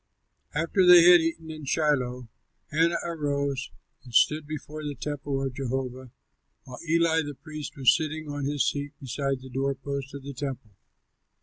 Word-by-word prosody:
After 165 +4 +2
they 180 -1 +9
had 175 0 +8
eaten 165 0 -3
in 155 -2 -8
Shiloh, 130 -5 0 0.4
Hannah 165 +3 +3
arose 140 -5 -2 0.3
and 120 -3 -11
stood 150 +4 +4
before 155 0 -6
the 145 -1 -4
temple 140 0 -3
of 135 - -3
Jehovah, 130 -1 -4 0.5
while 125 -1 -10
Eli 165 0 +3
the 145 -2 -6
priest 155 0 -8
was 130 -3 +5
sitting 155 -1 -3
on 145 -1 -4
his 145 0 +1
seat 145 0 -2
beside 135 0 -2
the 130 - -10
door 135 +2 -1
posts 140 0 -5
of 140 - -8
the 140 0 -7
temple. 130 -5 -5
145 Hz, 165 wpm, -27 LUFS, 135-155 Hz, 0.5 s, they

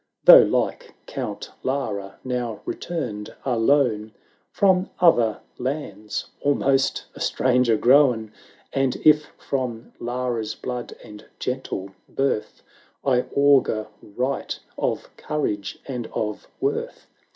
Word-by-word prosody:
Though, - - +11
like - - -1
Count - - -5
Lara, 105 -8 -3
now 125 -3 -3
re - - -2
turned 120 -12 -5
alone 115 -3 +2 0.4
From 190 -1 +3
other 120 -11 +4 0.2
lands, 125 -6 -3 0.2
almost 135 -1 +2
a - - -12
stranger 125 -3 +2
grown; 120 -4 +4 0.4
And 135 -2 +1
if 150 -1 +6
from 125 -4 -4
Lara's 120 -2 -2
blood 125 -1 -5
and 105 0 -12
gentle 125 -7 -4 0.2
birth 135 -5 -1 0.4
I 125 -2 +3
augur 140 -6 +4
right 125 +6 -3 0.2
of - - -2
courage 105 -10 -2
and 125 -4 -4
of 105 -1 -3
worth. 440 +5 -2
125 Hz, 105 wpm, -24 LUFS, 110-140 Hz, 0.4 s, Though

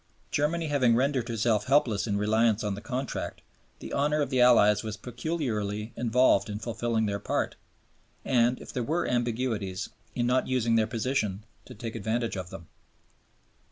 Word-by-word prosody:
Germany 160 +3 0
having 130 -5 +3
rendered 130 -1 +1
herself 115 -1 +1
helpless 125 -6 +2
in 100 -1 0
reliance 110 +1 +2
on 105 -1 -1
the 100 - -6
Contract, 125 +3 -4 0.4
the - - -8
honor 150 +2 +1
of 145 -2 -1
the 130 -1 +3
Allies 110 -4 +6
was 110 -2 -5
peculiarly 115 -5 -3
involved 120 -3 +3
in 105 - -3
fulfilling 115 0 -1
their 100 -1 -2
part - - -1 0.7
and, 125 -1 +2
if - - -10
there 125 - -1
were 160 +8 -1
ambiguities, 120 -5 -1 0.3
in 120 - 0
not 125 +1 +2
using 120 -3 +1
their 110 -1 +3
position 110 -4 -1 0.2
to - - -11
take 115 +1 -6
advantage 115 +1 -2
of 90 -2 -5
them. 85 -2 -10
115 Hz, 160 wpm, -28 LUFS, 105-130 Hz, 0.7 s, Allies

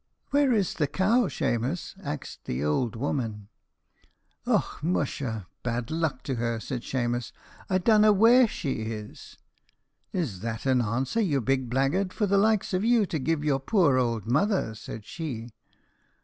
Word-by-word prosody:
"'Where 285 -2 +4
is 205 -6 +1
the 150 - 0
cow, 210 - +2
Shemus?' 125 +7 -2
axed 145 -3 -6
the 65 +3 -2
ould 100 - 0
woman. 115 -5 -3 1.0
"'Och, - - 0
musha, 135 - -2 0.2
bad 120 +1 -3
luck 160 -5 -1
to 135 -3 -3
her,' 115 -1 -1
said 125 +1 -5
Shemus, 120 -2 -2 0.4
'I 185 - +3
donna 215 +2 +5
where 230 +5 +6
she 155 -9 -3
is!' 110 -1 -7 0.7
"'Is 145 - -2
that 115 +2 -4
an 130 -2 +3
answer, 130 - 0
you 155 -10 +1
big 130 0 0
blaggard, 140 +10 +1
for 210 - 0
the 200 0 +3
likes 215 -1 +2
o' - - +3
you 225 +1 +3
to 160 -4 -3
give 150 +2 0
your 145 -3 +1
poor 145 - +3
ould 115 -4 -1
mother?' 150 - +1
said 110 0 -9
she. 120 -8 -6
135 Hz, 155 wpm, -27 LUFS, 115-190 Hz, 1.0 s, where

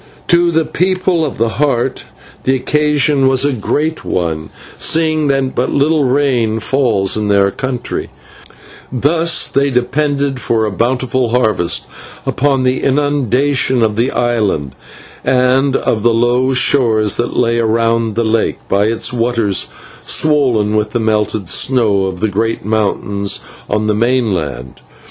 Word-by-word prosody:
To 175 0 +4
the 160 -1 +1
People 185 -1 0
of 145 - -3
the 115 +2 -1
Heart 130 -3 0 0.4
the 130 - +2
occasion 150 0 +1
was 130 +1 +2
a 145 - +1
great 150 +7 -2
one, 80 -3 -3 0.3
seeing 155 -2 +1
that 135 -1 0
but 125 - -1
little 150 +1 +1
rain 125 -5 +1
falls 115 -6 +1
in 105 -1 -1
their 100 -1 +3
country, 130 0 -4 0.8
and 125 -1 -6
thus 165 +3 +2
they 140 +1 +1
depend 140 +1 -1
for 115 -2 0
a 105 - -2
bountiful 125 +3 0
harvest 110 -8 0 0.4
upon 135 -1 0
the 130 0 0
inundation 135 -2 +1
of 110 -1 +1
the 120 +4 +1
island 105 - -1 0.5
and 130 +2 +2
of 110 - 0
the 115 +1 +2
low 125 +3 +1
shores 115 -5 +2
that 120 - -2
lay 115 -1 +1
around 115 -1 0
the 115 - +1
lake 110 0 0
by 100 +1 +1
its 115 +3 -1
waters 115 -4 0 0.3
swollen 125 -9 +1
with 105 0 -1
the 120 - 0
melted 110 -3 -1
snow 105 -4 +2
of 95 -1 -5
the 110 - +2
great 110 +1 -2
mountains 100 -2 -1 0.3
on 105 +1 0
the 105 - +1
mainland. 95 - -1
120 Hz, 145 wpm, -15 LUFS, 110-140 Hz, 0.8 s, To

